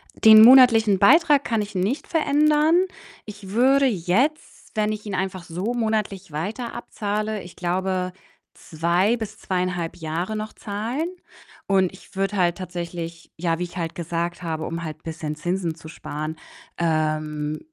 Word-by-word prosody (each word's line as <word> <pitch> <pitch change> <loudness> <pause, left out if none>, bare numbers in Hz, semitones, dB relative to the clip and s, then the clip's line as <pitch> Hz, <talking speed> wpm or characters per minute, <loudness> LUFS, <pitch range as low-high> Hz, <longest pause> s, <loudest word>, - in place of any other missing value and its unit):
Den 220 -1 +8
monatlichen 230 -5 +7
Beitrag 295 - +5
kann 225 -2 0
ich 205 0 -7
nicht 210 +11 -1
verändern. 305 +2 +3 0.4
Ich 205 -2 -10
würde 265 +6 +4
jetzt, 240 - -1
wenn 215 0 +1
ich 215 0 -6
ihn 200 - -4
einfach 185 -1 -3
so 180 +7 -3
monatlich 215 -6 -2
weiter 205 - -4
abzahle, 215 -2 -3
ich 175 - -12
glaube, 185 +1 -1 0.4
2 175 +7 0
bis 220 -3 -6
2,5 180 -2 -2
Jahre 170 +5 -3
noch 215 0 -5
zahlen. 225 +10 -3 0.6
Und 190 -2 +2
ich 190 - -17
würde 195 +1 -1
halt 175 -2 +2
tatsächlich 170 -2 -6
ja, 165 0 -1
wie - - -1
ich 180 +1 -8
halt 165 -1 -3
gesagt 170 +1 -3
habe, 160 -2 -3
um 165 0 -4
halt 155 0 -7
bisschen 160 -2 -5
Zinsen 175 +1 -2
zu 160 - -13
sparen, 155 0 -6 0.4
ähm, 155 -2 -1
190 Hz, 150 wpm, -23 LUFS, 170-220 Hz, 0.6 s, Den